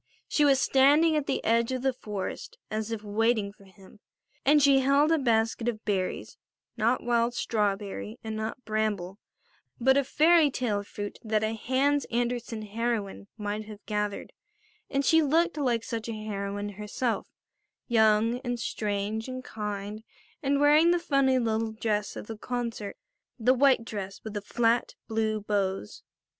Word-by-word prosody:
She 300 - +2
was 275 -2 +5
standing 290 +5 +4
at 295 -2 -1
the - - -1
edge 230 +2 +2
of 255 -1 -3
the 265 -1 +2
forest 210 -5 -6
as 215 0 -2
if 220 -2 -4
waiting 215 0 +1
for 200 - -19
him, 190 +2 -18 0.4
and 295 +3 +5
she 275 -1 +5
held 280 +4 +3
a 325 - +3
basket 225 -2 +1
of 225 -2 -3
berries, 190 -3 -2 0.4
not 235 +2 +1
wild 235 0 +1
strawberry 210 0 -2
and 220 -1 -4
not 220 +3 -5
bramble, 210 -3 -2 0.6
but 265 +3 +4
a 280 - +3
fairy 315 +3 +4
tale 235 -6 -1
fruit 205 0 -7
that 215 -1 0
a 220 +1 0
Hans 270 +5 +1
Andersen 235 -2 -2
heroine 215 -2 -3
might 210 0 -3
have 210 -1 -11
gathered, 210 -1 -3 0.6
and 275 0 0
she 320 -1 +5
looked 325 +4 +2
like 245 -6 +1
such 230 -1 -4
a - - -2
heroine 205 -1 -4
herself, 210 +4 -3 0.6
young, 225 0 +3
and 245 -2 -3
strange, 210 +1 -2
and 255 0 -6
kind, 210 -1 -5 0.4
and 280 -1 +1
wearing 300 +3 +6
the 350 - +4
funny 275 -5 +2
little 225 -2 0
dress 210 -2 -2
of - - -7
the 220 0 -8
concert, 235 -4 -4 0.4
the 250 +1 +4
white 260 -3 +4
dress 200 -4 -6
with 220 - -6
the 205 - -3
flat 230 +3 +1
blue 220 -1 -1
bows. 195 - -2
225 Hz, 160 wpm, -28 LUFS, 210-260 Hz, 0.6 s, wearing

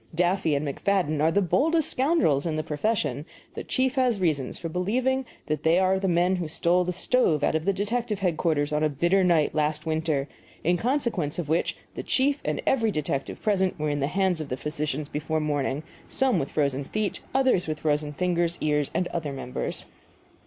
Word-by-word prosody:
Duffy 175 -3 +2
and 145 +1 -1
McFadden 155 0 0
are 160 +1 +4
the 200 +3 +2
boldest 315 - +2
scoundrels 255 - +2
in 160 - -1
the 155 - -1
profession; 150 - -1 0.3
the - - -5
chief 260 -1 0
has 250 -6 +2
reasons 155 -8 0
for 170 - -5
believing 245 +10 0 0.2
that 155 -1 -2
they 160 +2 +3
are 190 0 +3
the 195 - -1
men 180 +1 +2
who 175 -3 -3
stole 170 +3 +2
the 180 - -2
stove 180 - +1
out - - +2
of 160 0 -1
the 200 - +3
detective 210 +3 -2
headquarters 160 -5 0
on 150 - +1
a 155 - +3
bitter 170 +7 +2
night 170 -4 +3
last 155 0 0
winter 155 -3 0 0.4
in 175 +3 +3
consequence 230 - -1
of 170 -5 -4
which 165 +2 0 0.2
the - - -5
chief 280 +2 +1
and - - -2
every 230 -4 +2
detective 145 -6 -3
present 190 -3 +1
were 150 -1 -1
in 145 - -1
the 140 - +1
hands 185 -1 0
of 155 - -6
the 125 - -2
physicians 150 0 -3
before 155 +2 -2
morning, 145 -1 -1 0.3
some 265 -2 +2
with 135 - -3
frozen 140 -2 0
feet, 210 +6 -2 0.2
others 260 -10 +3
with 155 -1 -3
frozen 150 -1 0
fingers, 175 +1 0
ears, 150 -2 +1
and 180 - +1
other 160 -4 -3
members. 130 -2 -4
170 Hz, 195 wpm, -26 LUFS, 150-195 Hz, 0.4 s, are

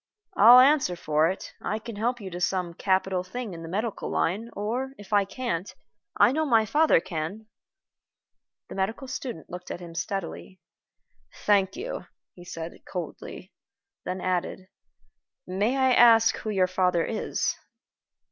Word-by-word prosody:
I'll 245 -6 +9
answer 265 -8 +4
for 155 -1 +1
it 190 - -6
I 215 - -2
can 225 0 -8
help 240 +4 -1
you 195 -3 -8
to 175 +1 -6
some 180 -2 -1
capital 185 0 0
thing 210 +2 -6
in 165 - -8
the 165 - -8
medical 215 +4 -3
line, 210 +7 -1
or, 245 +6 -3
if 205 0 -10
I 200 -1 +4
can't, 200 -3 -4 0.5
I - - +6
know 315 +3 0
my 230 -7 +3
father 300 - +4
can." 180 +4 -5 1.2
The - - -9
medical 220 +8 -2
student 245 - -6
looked 180 +1 -8
at - - -5
him 170 -2 -10
steadily. 185 +1 -5 0.9
"Thank 200 -2 +3
you," 435 +8 -6 0.3
he 175 - -13
said, 165 -1 -7
coldly; 180 -4 -7 0.5
then 185 0 -4
added, 185 +1 -2 0.8
"May 205 +8 0
I 260 -1 +4
ask 225 -2 +6
who 220 - -5
your 190 -3 +2
father 180 -2 +1
is?" 220 - -2
195 Hz, 150 wpm, -26 LUFS, 180-230 Hz, 1.2 s, I'll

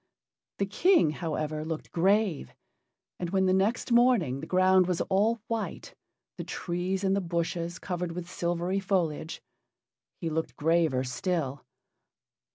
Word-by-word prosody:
The 200 - +1
King, 315 - +3
however, 155 -1 -3
looked 160 0 -5
grave, 190 - +1 0.6
and 175 - -3
when 190 +1 +2
the 185 - +3
next 205 +7 +1
morning 235 - +4
the 155 - -7
ground 185 0 +4
was 180 -2 0
all 215 +3 +1
white, 230 -1 -4 0.5
the - - -2
trees 180 +2 -3
and 195 0 +2
the 200 - 0
bushes 170 0 -2
covered 180 -2 -4
with 175 0 -6
silvery 175 +2 -1
foliage, 170 -5 -1 0.8
he 170 - -3
looked 160 0 -2
graver 160 -4 +2
still. 140 +1 -2
175 Hz, 135 wpm, -28 LUFS, 160-195 Hz, 0.8 s, morning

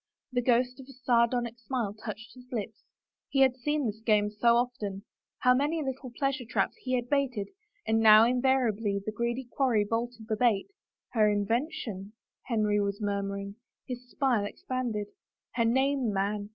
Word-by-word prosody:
The 245 -1 +1
ghost 250 +1 +2
of 265 - -11
a - - -11
sardonic 240 -2 +1
smile 235 -3 -2
touched 215 +1 -8
his 250 -1 -15
full 245 - -2
lips 210 - -6 0.3
— - - -64
he 270 - +2
had 260 -2 +5
seen 295 +3 -1
this 220 -1 -3
game 210 -2 +2
so 235 +3 +3
often 220 -5 -2
I 250 - -4
How - - +8
many 295 +5 0
little 265 -1 -5
pleasure 275 -1 0
traps 235 - -1
he 255 - -4
had 245 -1 -2
baited 250 -7 0 0.2
— 415 0 -32
and 225 0 +2
how 215 0 +9
invariably 240 -5 +1
the 215 - -2
greedy 235 +3 -2
quarry 240 -7 +2
bolted 230 +1 -3
the 215 -1 -1
baitl 230 - +2 0.3
" - - -64
Her 215 -3 +4
invention? 210 - -2
" - - -64
Henry 215 -3 +1
was 200 0 -2
murmuring. 200 -1 -3 0.3
His 250 -1 -7
smile 250 -7 +1
expanded. 235 -1 -3 0.3
*' - - -63
Her 230 - +3
name, 265 0 +2
man. 205 +1 -1
235 Hz, 185 wpm, -29 LUFS, 210-255 Hz, 0.3 s, how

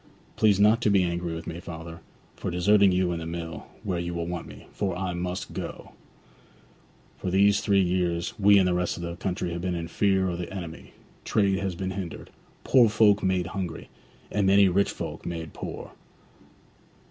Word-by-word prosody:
Please 105 -3 +3
not 105 +3 +5
to 110 - +3
be 100 -2 +4
angry 85 -1 -2
with 80 - -7
me, 85 +1 -6
father, 80 -1 -8 0.4
for - - -4
deserting 100 +3 +4
you 90 -1 +1
and 85 -1 -3
the 80 - -5
mill, 85 -1 -6 0.2
where 90 -4 -2
you 85 0 -4
want 85 0 -4
me, - - -12
for 95 -3 -2
I 95 -1 -2
must 90 +1 -4
go. - - -6 1.3
For 95 - -3
these 100 +2 +4
three 100 -2 +3
years 90 -1 0
we 100 0 +6
and 95 -2 +4
the 90 - +2
rest 90 0 -1
of 85 - -6
the 85 0 -4
country 90 -1 -3
have 85 - -4
been 90 0 -1
in 85 -1 -4
fear 95 +2 +2
of 85 -1 -3
the 90 - -5
enemy; 85 -4 -8 0.3
trade 100 -2 +2
has 95 -2 -2
been 95 +1 -3
hindered; 95 -3 -6 0.3
poor 120 -4 +5
folk 105 -1 +4
made 95 -2 +1
hungry; 90 -4 -5 0.4
and 100 -2 +1
many 100 0 +6
rich 100 +2 +2
folk - - -6
made 80 -2 -5
poor. - - -7
90 Hz, 190 wpm, -26 LUFS, 85-100 Hz, 1.3 s, we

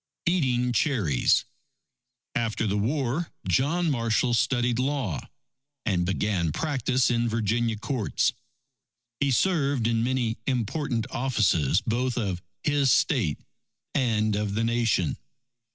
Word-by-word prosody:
Eating 125 -8 +1
Cherries 105 - +2 0.9
After 115 -1 -1
the 100 -1 0
war, 135 +8 -1 0.2
John 160 +5 +2
Marshall 115 -1 +1
studied 120 0 +1
law, 130 - -2 0.6
and 90 -4 +1
began 95 -4 0
practice 130 - 0
in 120 0 +1
Virginia 115 0 0
courts. 120 0 0 0.9
He 140 - +2
served 140 -4 +1
in 115 0 +1
many 120 -2 0
important 125 -1 -1
offices 105 - +2
both 120 +3 -1
of 95 -6 -2 0.2
his 145 -3 +2
State 120 - +2 0.5
and 110 -5 +1
of 105 -1 -2
the 115 - +1
Nation. 115 -8 +1
120 Hz, 110 wpm, -26 LUFS, 110-135 Hz, 0.9 s, Cherries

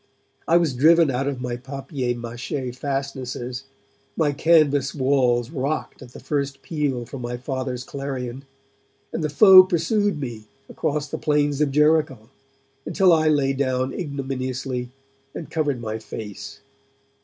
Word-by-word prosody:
I 170 - +5
was 165 -5 +1
driven 160 +3 +5
out 135 +2 -1
of 135 -3 -3
my 125 -1 -2
papier 135 -1 -4
mache 120 +2 -5
fastnesses, 130 -1 -4 0.5
my 155 -3 +2
canvas 145 -3 +3
walls 130 -3 +1
rocked 145 +1 -3
at 125 -2 -12
the - - -10
first 140 -2 -3
peal 145 -7 -2
from 130 +2 -8
my 120 0 -4
Father's 130 -1 -4
clarion, 135 -2 -5 0.7
and 165 - -2
the 155 - 0
foe 190 +5 +9
pursued 195 +1 0
me 120 -6 -6 0.2
across 150 -1 -2
the - - -5
plains 145 -1 +1
of 145 -2 +2
Jericho 150 -5 +2 0.5
until 185 -3 +3
I 155 -1 +3
lay 140 -3 +2
down 130 -1 -1
ignominiously 130 -4 -4 0.5
and 160 - -7
covered 145 -5 0
my 110 -1 -4
face. 110 -2 -8
135 Hz, 140 wpm, -23 LUFS, 125-150 Hz, 0.7 s, foe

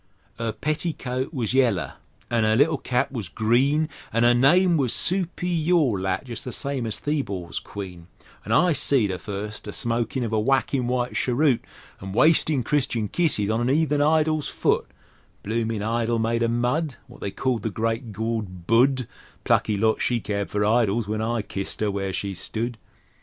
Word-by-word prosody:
'Er 115 -1 -1
petticoat 140 -2 -3
was 125 -7 -2
yaller 120 -10 +2 0.4
an' 115 -2 +2
'er 110 0 +3
little 145 +3 +3
cap 125 +2 0
was 110 -10 -5
green, 135 - +2 0.2
An' 115 +2 +2
'er 120 - +6
name 170 +9 +4
was 135 -6 +2
Supi 180 -2 0
yaw 170 -8 +4
lat 95 +6 -2
jes' 120 -2 -4
the 125 - -6
same 135 -1 -3
as 110 - -4
Theebaw's 105 - -3
Queen, 90 -4 -8 0.4
An' - - -6
I 180 -2 +4
seed 135 -7 +3
her 90 - -4
first 105 +3 -6
a - - -4
smokin' 120 +3 -1
of 115 -1 -3
a 110 - +2
whackin' 130 +1 +1
white 125 0 -1
cheroot, 130 0 +2 0.4
An' 95 - -7
a 95 - -6
wastin' 155 -1 +4
Christian 125 -6 0
kisses 125 - +1
on 110 +2 0
an 120 - +1
'eathen 150 0 +2
idol's 155 0 +2
foot: - - 0 0.6
Bloomin' 110 0 -2
idol 115 +1 0
made 115 +1 0
o'mud 120 +5 0
Wot - - -15
they - - -2
called 125 +2 -1
the 110 - -2
Great 115 +3 -2
Gawd 105 -4 -4
Budd 125 +3 +3 0.4
Plucky 105 -2 +2
lot 110 +2 +1
she 120 -1 +1
cared 100 -2 -3
for 105 0 0
idols 110 -1 +2
when 110 +1 -2
I 115 0 -1
kissed 100 -1 -5
'er 105 -1 0
where 100 -1 -2
she 100 +1 -3
stud! 115 +5 -3
120 Hz, 180 wpm, -24 LUFS, 110-140 Hz, 0.6 s, er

